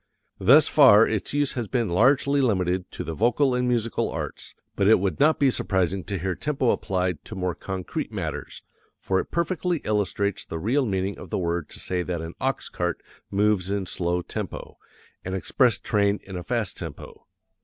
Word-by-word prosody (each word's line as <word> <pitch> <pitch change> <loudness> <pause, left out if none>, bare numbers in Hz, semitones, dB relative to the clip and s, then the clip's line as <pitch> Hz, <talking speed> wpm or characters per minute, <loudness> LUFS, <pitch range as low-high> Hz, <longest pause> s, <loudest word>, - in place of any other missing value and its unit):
Thus 135 +10 +6
far 120 -7 +7
its 110 -3 -2
use 145 -1 +1
has 120 -4 -3
been 120 -3 0
largely 140 +8 +3
limited 95 -6 0
to - - -5
the 80 - -5
vocal 125 - +2
and 125 0 0
musical 115 -2 0
arts, - - -6 0.2
but 100 - +2
it 110 - +6
would 95 0 -2
not 155 +2 +4
be 140 -2 +3
surprising 95 -4 0
to 100 - -3
hear 95 +2 -2
tempo 135 +1 0
applied 90 -4 -1
to 110 - -8
more 90 -2 -1
concrete 95 0 -5
matters, - - -5 0.4
for 95 -1 0
it - - -4
perfectly 175 +1 -1
illustrates 100 -1 0
the 80 - -6
real 125 - +1
meaning 95 0 -2
of - - -10
the - - -1
word 85 -3 -2
to - - -9
say 90 -1 -2
that 90 -1 -3
an 80 +1 -6
ox 135 +1 -1
cart 90 -1 -2 0.3
moves 100 -2 +1
in 100 -1 -1
slow 90 0 -1
tempo, - - -6 0.4
an 95 +1 -3
express 120 +6 +2
train 100 -1 +1
in 95 - -9
a 90 - -4
fast 115 -2 -2
tempo. - - -9
100 Hz, 185 wpm, -25 LUFS, 90-125 Hz, 0.4 s, far